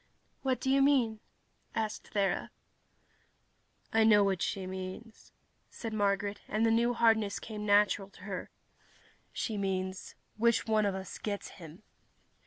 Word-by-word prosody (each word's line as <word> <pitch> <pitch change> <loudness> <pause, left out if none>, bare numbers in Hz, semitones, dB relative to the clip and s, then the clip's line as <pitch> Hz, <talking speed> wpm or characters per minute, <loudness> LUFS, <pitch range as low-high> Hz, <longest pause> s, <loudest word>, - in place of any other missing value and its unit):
"What 260 -2 0
do 265 - 0
you 275 0 +4
mean?" 255 -6 +3 0.6
asked 220 -1 -3
Thera. 195 -3 +1 1.4
"I 225 0 +5
know 210 -2 +6
what 195 -2 0
she 190 -1 -2
means," 190 +4 -8 0.4
said 225 -2 -6
Marguerite, 205 -1 0
and 215 +2 +1
the 225 - +4
new 235 +2 +2
hardness 225 -3 +3
came 210 -1 -6
natural 205 -1 +3
to 195 - -18
her. 195 -2 -5 0.8
"She 215 -3 -3
means, 185 -1 -3 0.2
which 235 +1 +3
one 215 -2 +2
of 195 - -1
us 190 -1 -7
gets 205 -2 -4
him?" 170 +2 -12
210 Hz, 140 wpm, -31 LUFS, 195-225 Hz, 1.4 s, know